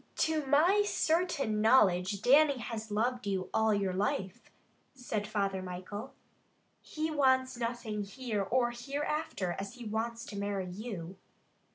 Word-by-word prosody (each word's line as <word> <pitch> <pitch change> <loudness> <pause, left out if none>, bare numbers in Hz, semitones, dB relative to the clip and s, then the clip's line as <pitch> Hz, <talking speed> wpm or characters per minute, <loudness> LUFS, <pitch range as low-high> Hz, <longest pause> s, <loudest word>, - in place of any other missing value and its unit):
"To 315 -1 +1
my 335 +9 +5
certain 320 - +1
knowledge 200 -4 +4
Dannie 280 +2 +6
has 225 -2 -5
loved 230 +2 -1
you 190 -2 -2
all 220 0 +3
your 200 -3 +1
life," 190 -1 -2 0.5
said 220 -5 -3
Father 200 -3 -1
Michael. 185 +6 -7 0.7
"He 315 +1 -3
wants 260 -3 +3
nothing 230 -3 -3
here 215 +1 -3
or 240 +4 +1
hereafter 275 - -3
as 195 0 -6
he 245 -1 -9
wants 230 +2 -3
to - - -8
marry 200 -3 -2
you." 190 -3 -6
220 Hz, 135 wpm, -32 LUFS, 200-260 Hz, 0.7 s, Dannie